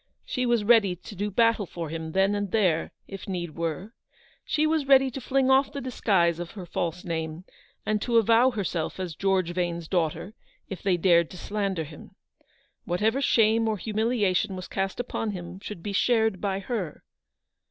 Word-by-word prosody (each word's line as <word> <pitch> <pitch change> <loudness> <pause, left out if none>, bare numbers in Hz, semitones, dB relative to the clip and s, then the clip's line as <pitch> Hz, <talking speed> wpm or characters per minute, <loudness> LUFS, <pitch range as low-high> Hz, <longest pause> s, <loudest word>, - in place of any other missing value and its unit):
She 255 -1 -1
was 235 -3 +2
ready 205 -4 +4
to 195 +4 -11
do 205 +2 -2
battle 230 -1 +2
for 165 -2 -6
him 160 0 -5
then 195 +1 +3
and 205 -1 -2
there, 185 -7 +1 0.2
if 195 0 -8
need 175 -3 -3
were. 170 +6 -4 0.5
She 305 - +1
was 310 -3 +1
ready 270 -1 +5
to 270 - -6
fling 265 +1 +2
off 265 +1 +4
the 280 - -5
disguise 190 -10 +1
of 175 -1 -5
her 195 -5 -7
false 175 +1 -3
name, 160 0 -4 0.4
and 215 -1 0
to 235 0 +2
avow 230 +3 +5
herself 190 -8 -3
as 180 -3 -3
George 190 0 +1
Vane's 170 -2 -2
daughter, 175 +3 -1 0.3
if 195 - -7
they 185 -3 +2
dared 170 -2 +4
to 180 - -10
slander 195 -4 -2
him. 150 0 -12 0.7
Whatever 215 +9 0
shame 225 -3 +3
or 215 - -1
humiliation 215 -2 0
was 185 -1 -7
cast 195 +2 -3
upon 225 -3 -2
him 175 0 -7
should 200 -4 -8
be 205 - -4
shared 220 -2 +2
by 195 -1 -1
her. 195 - -4
195 Hz, 180 wpm, -26 LUFS, 175-225 Hz, 0.7 s, ready